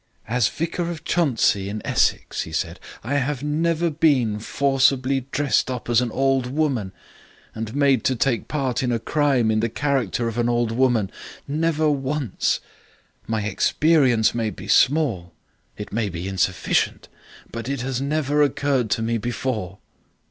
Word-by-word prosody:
"As 120 0 +2
Vicar 170 +1 -3
of 170 -2 -6
Chuntsey, 115 - +1
in 105 +1 -4
Essex," - - +1
he 80 - -6
said, 85 +2 -3 0.2
"I 135 +6 -1
have 140 0 -2
never 165 +3 0
been 130 -9 +2
forcibly 135 +1 +1
dressed 140 -1 +1
up 125 -1 -4
as 120 +1 +4
an 125 - -1
old 135 -1 +1
woman 130 -8 -1 0.6
and 110 +2 -5
made 140 -5 +3
to 130 - +2
take 120 0 0
part 135 -3 -1
in 125 -2 0
a 120 - +1
crime 130 -1 +1
in 110 - +1
the 115 +1 0
character 125 -4 -1
of 115 +1 -3
an 120 0 +1
old 120 -1 +1
woman. 120 -4 +1 0.4
Never 155 +1 +1
once. 140 -4 -1 0.7
My 110 -2 -1
experience 125 0 +3
may 115 -2 -1
be - - -9
small. 125 - +2 0.4
It 105 - -8
may 110 -2 0
be 85 +1 -5
insufficient. 95 -1 0 0.4
But 115 +2 -5
it 140 -3 -2
has 130 0 -2
never 145 0 0
occurred 140 -4 +1
to 110 - 0
me 115 0 0
before." 110 -4 -3
130 Hz, 155 wpm, -23 LUFS, 110-145 Hz, 0.7 s, as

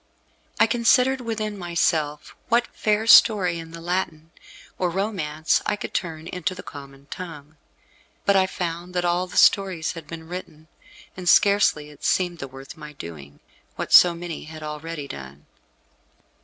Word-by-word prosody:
I - - +7
considered 250 +2 +3
within 215 -3 -4
myself 160 -4 -1
what 235 +1 +3
fair 215 +1 0
story 195 -7 +6
in 165 0 -9
the 165 +1 -9
Latin 165 -2 -3 0.5
or 180 - +1
Romance 170 -5 -1
I - - +1
could - - -7
turn 160 -3 -3
into 180 +1 -3
the 180 - -9
common 140 -1 -11
tongue. 155 -4 -9 0.7
But 200 - +4
I 190 -1 +4
found 175 0 -5
that 175 0 0
all 175 +1 +1
the - - -8
stories 190 -5 +3
had 165 -3 -10
been 160 0 -9
written, 160 -3 -9 0.5
and 180 -1 -2
scarcely 200 -7 +4
it 145 - -18
seemed 175 -2 0
the 135 - -5
worth 135 +1 -11
my 150 -1 -10
doing, 75 - -10 0.3
what - - -4
so 175 -1 +8
many 170 -1 -7
had 155 0 -10
already 150 0 -6
done. 70 - -10
170 Hz, 155 wpm, -24 LUFS, 150-185 Hz, 0.7 s, so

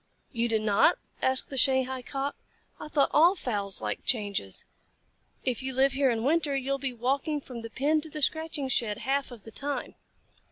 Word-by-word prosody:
"You 235 -2 0
do 225 - +3
not?" 215 -2 +4 0.2
asked 260 +1 +2
the 270 - +2
Shanghai 260 -1 +3
Cock. 275 +2 -3 0.4
"I - - -7
thought 290 -2 +2
all 340 +5 +6
fowls 205 - -2
liked - - -3
changes. 200 - -1 0.8
If 255 -2 0
you 260 -1 -4
live 270 +1 +4
here 270 0 +3
in 225 -2 0
winter, 295 0 +2
you 270 0 -2
will 275 - 0
be 270 -1 -2
walking 270 +5 -1
from 250 -4 -8
the 230 - -7
pen 295 +6 +1
to 320 - -7
the 300 -1 -4
scratching 315 -2 0
shed 230 -5 0
half 270 +3 0
of 240 -5 -11
the 225 - -10
time." 285 +4 -4
265 Hz, 195 wpm, -28 LUFS, 235-285 Hz, 0.8 s, all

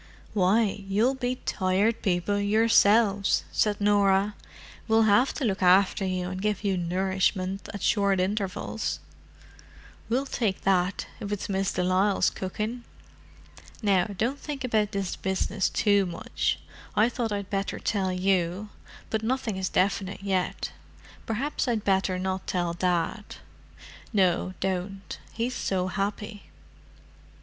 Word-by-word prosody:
"Why, 205 +1 +2
you'll 215 +7 +2
be 255 -1 -2
Tired 200 +4 +1
People 195 +1 0
yourselves," 205 -1 +4
said 210 -1 +1
Norah. 205 0 +3 0.5
"We'll 225 0 +4
have 220 +5 +4
to 275 - -2
look 195 -4 -1
after 185 +2 +4
you 185 -1 -1
and 185 0 -5
give 210 0 -1
you 195 -2 +1
nourishment 185 +2 -1
at 205 -4 -7
short 200 -3 +2
intervals." 195 +1 -2 1.1
"We'll 255 +4 +1
take 220 -7 -1
that, 185 0 +1
if 205 - -5
it's 205 - -3
Miss 195 0 0
de 180 - -1
Lisle's 190 +2 +2
cooking. 215 +6 -4 1.0
Now 195 -4 +3
don't 230 +7 -2
think 285 -3 -5
about 215 -4 +1
this 195 -3 -2
business 190 +1 -1
too 205 -3 +2
much. 170 - -2 0.4
I 215 +2 +5
thought 240 -2 -2
I'd 200 -1 -4
better 195 0 -1
tell 195 -4 -1
you, 185 +1 0 0.4
but 220 - 0
nothing 230 -2 -1
is 190 -1 -2
definite 195 +1 0
yet. 190 -2 -1 0.6
Perhaps 265 +6 -1
I'd 225 -4 0
better 190 -1 +1
not 185 0 -3
tell 175 -2 -1
Dad." 180 +4 -1 0.8
"No, 185 -3 +1
don't; 195 +1 -3
he's 235 +2 -2
so 185 -5 -1
happy." 205 +2 -4
200 Hz, 130 wpm, -27 LUFS, 185-215 Hz, 1.1 s, I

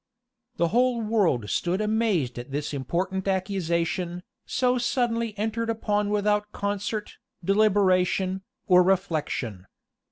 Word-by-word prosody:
The 170 - +2
whole 245 +2 +2
world 205 - +1
stood 180 +2 0
amazed 210 - 0
at 120 - -8
this 145 +2 -3
important 185 +8 -2
accusation, 180 -2 -1 0.2
so 250 -1 +1
suddenly 235 -3 0
entered 225 +2 -1
upon 210 -2 0
without 210 0 +1
concert, 205 +1 -3 0.3
deliberation, 190 -2 +2 0.2
or 180 -1 +6
reflection. 155 - -1
195 Hz, 105 wpm, -26 LUFS, 175-215 Hz, 0.3 s, or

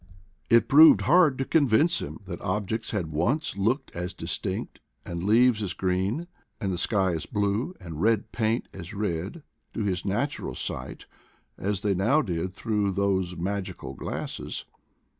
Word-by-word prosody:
It 115 -1 +5
proved 155 +3 +8
hard 165 -6 +5
to 135 - -1
convince 155 +3 +3
Vm 105 - -7
that 95 - -7
objects 105 +3 -2
had 90 -7 -2
once 105 - 0
looked 110 +8 -1
as 90 +1 -4
distinct, - - -4 0.3
and 85 0 -4
leaves 115 +2 +4
as 100 - -2
green, 95 - -1 0.3
and 95 -4 -1
the 90 - -3
sky 95 -1 +2
as 80 - -4
blue, 105 - -1
and 85 -4 -7
red 110 0 +2
paint 115 +1 0
as 95 +1 -8
red, 100 - -3 0.3
to 110 - -1
his 95 -3 -1
natural 115 +9 -2
sight, 65 - -5 0.5
as 100 0 -2
they 105 -2 +2
now 115 +12 +3
did 90 -2 -3
through 105 -3 0
those 95 -2 0
magical 95 +3 -4
glasses. - - -5
100 Hz, 155 wpm, -27 LUFS, 95-115 Hz, 0.5 s, proved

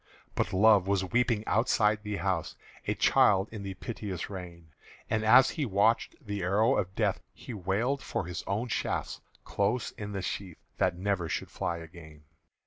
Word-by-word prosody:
But - - -1
Love 100 -1 +5
was 100 -1 +1
weeping 120 -2 +1
outside 110 -1 +2
the 105 -1 -4
house, 95 -5 -2 0.3
A - - +1
child 95 0 +4
in 110 -2 -7
the 100 -1 -5
piteous 100 -3 -5
rain; 85 -4 -9 0.4
And 110 -1 +1
as 125 +4 +7
he 155 - -2
watched 105 +3 +2
the 105 -1 -3
arrow 105 +8 +3
of 95 +1 -2
Death, - - 0
He - - -9
wailed 110 +8 -1
for - - -3
his 90 +1 -5
own 105 +5 -1
shafts - - -2 0.2
close 105 +5 -1
in 105 -1 -7
the 95 -2 -3
sheath 95 -2 -4 0.2
That 85 - +2
never 95 -3 -1
should - - -3
fly 85 - -2
again. 80 -2 -12
100 Hz, 170 wpm, -29 LUFS, 90-110 Hz, 0.4 s, as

